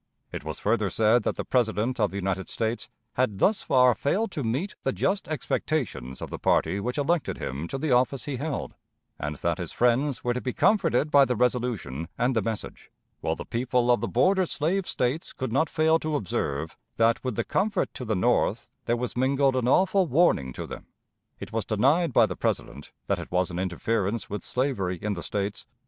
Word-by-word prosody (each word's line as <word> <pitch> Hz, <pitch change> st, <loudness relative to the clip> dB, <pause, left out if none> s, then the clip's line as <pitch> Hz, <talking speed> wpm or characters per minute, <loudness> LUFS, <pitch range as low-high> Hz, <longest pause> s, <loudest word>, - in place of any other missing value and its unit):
It -, -, -6 dB
was -, -, -5 dB
further 105 Hz, -1 st, +1 dB
said 110 Hz, +5 st, +3 dB
that -, -, -1 dB
the -, -, -4 dB
President 120 Hz, 0 st, 0 dB
of 105 Hz, -, +3 dB
the -, -, -10 dB
United 95 Hz, -1 st, -2 dB
States 115 Hz, +1 st, -2 dB, 0.2 s
had 125 Hz, -6 st, 0 dB
thus 195 Hz, -, +3 dB
far 125 Hz, -1 st, +4 dB
failed 195 Hz, -, 0 dB
to 145 Hz, -, -3 dB
meet 135 Hz, -, -1 dB
the -, -, 0 dB
just 195 Hz, +1 st, -1 dB
expectations 140 Hz, -, -2 dB
of -, -, -7 dB
the -, -, -5 dB
party 100 Hz, -, +2 dB
which 125 Hz, +6 st, -3 dB
elected 155 Hz, +3 st, 0 dB
him 70 Hz, +6 st, -4 dB
to 135 Hz, -, -4 dB
the 150 Hz, +1 st, -1 dB
office 125 Hz, +1 st, +2 dB
he 140 Hz, -3 st, -3 dB
held; 145 Hz, +2 st, -3 dB, 0.5 s
and 75 Hz, +1 st, -3 dB
that 85 Hz, +4 st, -1 dB
his 85 Hz, -3 st, -4 dB
friends 125 Hz, +3 st, +1 dB
were 120 Hz, -, +1 dB
to 125 Hz, -, -3 dB
be 125 Hz, -, -3 dB
comforted 155 Hz, -, +2 dB
by 140 Hz, -1 st, +7 dB
the 125 Hz, -2 st, +1 dB
resolution 115 Hz, -, -1 dB
and 125 Hz, +2 st, +1 dB
the 115 Hz, -, +3 dB
message, 110 Hz, +1 st, -5 dB, 0.3 s
while -, -, -1 dB
the -, -, -7 dB
people 125 Hz, 0 st, +1 dB
of 120 Hz, -, +3 dB
the 115 Hz, -, -1 dB
border 185 Hz, -, +3 dB
slave 175 Hz, +6 st, -1 dB
States 130 Hz, +6 st, -1 dB
could 130 Hz, -4 st, -4 dB
not 145 Hz, +4 st, +2 dB
fail 160 Hz, +1 st, +3 dB
to 155 Hz, -1 st, -2 dB
observe 80 Hz, -, -2 dB, 0.2 s
that 115 Hz, 0 st, +2 dB
with 130 Hz, -4 st, -2 dB
the -, -, 0 dB
comfort 200 Hz, 0 st, 0 dB
to -, -, -6 dB
the 110 Hz, -3 st, -1 dB
North 90 Hz, -, +1 dB
there 120 Hz, -, +1 dB
was 125 Hz, 0 st, -3 dB
mingled 135 Hz, +1 st, +2 dB
an 125 Hz, -2 st, 0 dB
awful 185 Hz, +6 st, +3 dB
warning 135 Hz, -, +3 dB
to -, -, -5 dB
them. -, -, -9 dB, 0.5 s
It -, -, -8 dB
was 115 Hz, -1 st, 0 dB
denied 140 Hz, -, +2 dB
by 120 Hz, -2 st, +5 dB
the 90 Hz, -4 st, -4 dB
President 70 Hz, -, -3 dB
that -, -, 0 dB
it -, -, -8 dB
was 90 Hz, 0 st, +1 dB
an 85 Hz, -, -4 dB
interference 100 Hz, +4 st, -1 dB
with 105 Hz, -, -4 dB
slavery 105 Hz, -9 st, -1 dB
in 105 Hz, +3 st, -2 dB
the 85 Hz, -, -5 dB
States. 100 Hz, +2 st, -3 dB
125 Hz, 205 wpm, -26 LUFS, 105-140 Hz, 0.5 s, by